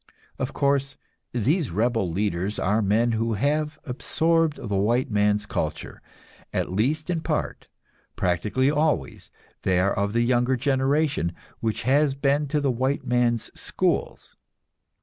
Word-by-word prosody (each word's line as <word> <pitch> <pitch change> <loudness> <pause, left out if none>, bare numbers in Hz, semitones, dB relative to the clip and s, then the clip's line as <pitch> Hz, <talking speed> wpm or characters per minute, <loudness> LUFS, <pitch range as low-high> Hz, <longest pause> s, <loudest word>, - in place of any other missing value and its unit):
Of - - -2
course, 140 -1 0 0.3
these 135 - +1
rebel 110 +1 0
leaders 95 +2 -1
are 105 +4 +1
men 110 +4 +2
who 115 0 0
have 150 +6 0
absorbed 160 +4 +1
the 105 -3 -3
white 115 +6 +1
man's 105 0 +2
culture, - - -4 0.5
at - - -2
least 145 - 0
in 165 -2 -1
part; - - -3 0.5
practically 100 - +1
always 150 0 -1 0.3
they 90 -1 +2
are 95 +2 +2
of 100 +1 -1
the 120 0 +2
younger 125 +1 +2
generation, 135 - +1 0.3
which 110 -1 -2
has 135 +2 +3
been 140 +1 +1
to 150 +2 0
the 140 -2 +1
white 130 +4 -1
man's 120 -2 +1
schools. - - -2
125 Hz, 135 wpm, -25 LUFS, 105-140 Hz, 0.5 s, has